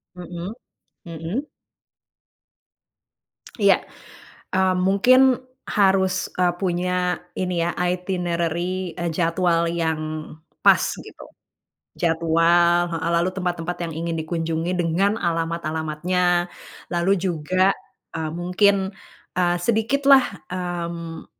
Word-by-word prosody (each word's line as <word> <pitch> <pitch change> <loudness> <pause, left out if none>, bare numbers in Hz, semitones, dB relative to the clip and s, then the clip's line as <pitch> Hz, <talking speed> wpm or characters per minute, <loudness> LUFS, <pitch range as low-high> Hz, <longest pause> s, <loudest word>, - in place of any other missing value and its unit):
Mhm 175 +3 -6 0.5
mhm. 170 - -4 2.2
Iya, - - +6 0.8
mmm 190 0 +3
mungkin 245 +7 +5 0.5
harus, 190 -2 +3 0.3
eee, 180 -1 +3
punya 180 -1 0 0.5
ini 180 -1 -1
ya 170 - 0 0.2
itinerary, 180 -1 -2
eee, 170 -1 -2
jadwal 170 0 +2
yang 165 -2 -1 0.6
pas - - +6 0.2
gitu, - - -12 0.8
jadwal 170 +1 +3
heeh, 165 +1 -2
lalu 170 +2 +2
tempat-tempat 175 -2 -3
yang 165 - -6
ingin 165 0 -2
dikunjungi 165 +1 -2
dengan 185 +5 +1
alamat-alamatnya, 170 +1 0 0.4
lalu 175 +2 +1
juga, 185 +2 +1 0.4
eee, 160 -1 -3
mungkin, 190 +3 +2 0.5
eee, 175 -1 +2
sedikitlah, 265 +4 +4 0.3
mmm, 170 -2 -4
175 Hz, 90 wpm, -23 LUFS, 165-185 Hz, 2.2 s, Iya